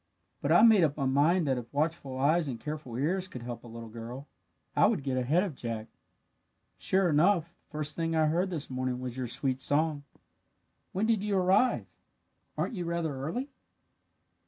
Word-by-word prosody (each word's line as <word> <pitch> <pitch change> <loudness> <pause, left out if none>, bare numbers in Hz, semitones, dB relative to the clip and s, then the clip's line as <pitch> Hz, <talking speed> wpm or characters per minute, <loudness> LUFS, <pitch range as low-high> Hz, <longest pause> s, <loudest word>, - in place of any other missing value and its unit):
"But - - 0
I - - +7
made 220 -6 +7
up 150 -2 +1
my 140 - 0
mind 150 +6 +3
that 130 -3 +1
if 120 -1 -10
watchful 145 -3 -1
eyes 155 +4 +2
and 120 -4 -4
careful 150 -3 -6
ears 180 +8 0
could 125 -9 -8
help 120 -1 -6
a - - -11
little 115 0 -8
girl, 120 +5 -8 0.5
I - - +6
would - - 0
get 135 -2 -1
ahead 140 +8 +2
of 190 -6 -3
Jack. 115 -4 -5 0.9
"Sure 190 -1 +2
enough, 170 +2 +3 0.2
the - - -39
first 150 -1 -2
thing 165 -1 -1
I 160 -1 +4
heard 170 +5 +1
this 160 -5 -3
morning 130 -1 -2
was 125 -1 -5
your 130 -1 -3
sweet 130 +1 -1
song. 150 +2 +1 0.9
When 195 +4 0
did 220 -3 +2
you 205 -1 0
arrive? 190 +7 +3 0.7
Aren't - - -1
you 180 -5 -3
rather 170 -3 -2
early?" 170 - -4
150 Hz, 185 wpm, -30 LUFS, 130-175 Hz, 0.9 s, I